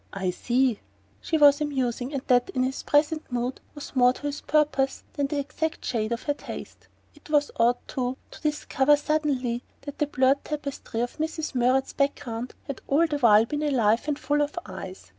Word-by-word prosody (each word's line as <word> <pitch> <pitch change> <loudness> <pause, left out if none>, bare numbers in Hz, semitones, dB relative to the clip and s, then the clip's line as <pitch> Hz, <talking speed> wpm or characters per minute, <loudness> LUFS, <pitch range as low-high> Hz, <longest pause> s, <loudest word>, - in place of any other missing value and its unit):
"I 190 -2 -1
see." 245 +3 +1 0.4
She 320 - 0
was 290 -1 +6
amusing, 260 -3 -1
and 275 -3 -3
that, 245 -1 +3
in 255 - +2
his 260 +1 -2
present 300 0 +1
mood, 245 +1 -2
was 290 -1 -9
more 250 -1 +5
to - - -13
his 290 0 -3
purpose 295 -3 +1
than 285 -1 0
the 290 - -3
exact 300 +3 -3
shade 220 -2 -1
of 235 - -2
her 290 - 0
taste. - - -9 0.3
It 360 - -18
was 295 -1 +2
odd, 240 +1 +4
too, 255 0 -2
to - - -12
discover 295 -2 +2
suddenly 290 -5 -1 0.2
that 285 0 -8
the 295 - +2
blurred 265 0 +2
tapestry 280 -6 -4
of 245 - -3
Mrs. 315 0 -3
Murrett's 255 +1 +2
background 255 -4 -2
had 280 - -6
all 300 +5 +4
the 295 -3 -2
while 220 -3 +6
been 295 +5 -3
alive 240 -5 +2
and 295 -2 0
full 290 +2 0
of 295 +3 -2
eyes. - - -8
275 Hz, 190 wpm, -26 LUFS, 245-295 Hz, 0.4 s, was